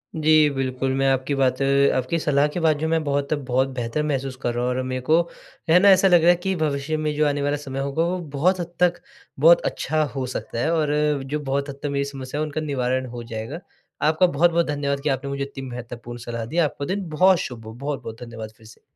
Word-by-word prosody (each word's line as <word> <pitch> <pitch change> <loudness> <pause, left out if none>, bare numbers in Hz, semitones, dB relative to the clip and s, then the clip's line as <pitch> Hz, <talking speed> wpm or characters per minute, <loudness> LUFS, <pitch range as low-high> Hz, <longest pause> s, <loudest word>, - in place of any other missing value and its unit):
जी। 155 -1 +4
बिल्कुल, 130 0 -1
मैं 135 0 +1
आपकी 135 +2 0
बातें 135 +1 +3
आपकी 130 +6 -1
सलाह 145 -1 +2
के - - -2
बाद 160 -3 +3
जो 160 - -1
मैं 160 0 +1
बहुत-बहुत 140 -2 0
बेहतर 120 +5 -1
महसूस 135 -3 -2
कर 120 - -1
रहा 120 +1 -2
हूँ 125 - +1
और 130 - -1
मेरे 130 0 -3
को, 160 +6 +3 0.5
है 170 +3 +7
ना, 200 +2 +6
ऐसा 190 0 +6
लग 175 -2 +6
रहा 170 - +5
है 175 - +7
कि 190 0 0
भविष्य 155 -1 -1
में 155 -1 -1
जो 150 0 +2
आने 145 0 -1
वाला 145 +1 0
समय 135 -2 -6
होगा, 140 +4 0
वो 180 +2 -1 0.2
बहुत 185 +5 +2
हद 170 0 -5
तक, 175 -1 +2 0.4
बहुत 165 +4 +7
अच्छा 155 0 0
हो 135 -1 -2
सकता 115 - -4
है। 155 +7 +1
और 150 -2 +1
जो 145 +3 -3
बहुत 140 0 -2
हद 140 0 -8
तक 145 - 0
मेरी 140 0 -1
समस्या 135 0 -6
है - - +1
उनका 155 +1 -4
निवारण 130 -3 -1
हो 120 - -6
जाएगा। 115 +6 -6 0.4
आपका 160 +4 +4
बहुत-बहुत 170 +1 +2
धन्यवाद 140 -1 -1
कि 150 - +1
आपने 135 0 -2
मुझे 140 0 -2
इतनी 135 -1 -7
महत्वपूर्ण 120 0 -8
सलाह 115 -1 -5
दी, 155 +9 -6
आपका 150 -4 0
दिन 190 +3 -3
बहुत 180 +4 +4
शुभ 115 -3 -6
हो। 110 - -8
बहुत-बहुत 130 -3 -6
धन्यवाद, 115 -2 -8
फिर 110 - -19
से। 110 - -16
140 Hz, 235 wpm, -23 LUFS, 130-155 Hz, 0.5 s, है